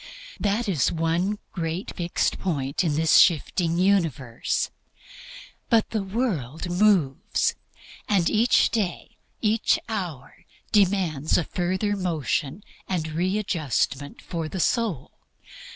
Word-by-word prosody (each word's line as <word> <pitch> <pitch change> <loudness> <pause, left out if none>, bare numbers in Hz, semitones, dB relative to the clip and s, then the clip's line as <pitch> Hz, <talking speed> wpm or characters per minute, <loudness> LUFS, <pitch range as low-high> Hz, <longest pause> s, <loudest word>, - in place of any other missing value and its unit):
That 210 +3 0
is 170 -9 +1
one 170 +5 0
great 165 +1 -4
fixed 175 -2 -1
point 140 -5 -1
in 155 -4 0
this 160 +1 +5
shifting 170 0 +3
universe. 165 -11 0 1.0
But 230 -2 +3
the 220 - 0
world 190 - -2
moves. 180 -8 +2 0.6
And 190 -5 +3
each 225 +3 +3
day, 200 -7 -3 0.2
each 220 +1 +2
hour, 180 - -6 0.3
demands 185 -8 +2
a 175 - +1
further 185 +5 -1
motion 165 - -2 0.3
and 165 -4 -1
readjustment 160 - -1
for 165 -3 -4
the 190 - -5
soul. 215 - 0
175 Hz, 105 wpm, -25 LUFS, 155-205 Hz, 1.0 s, this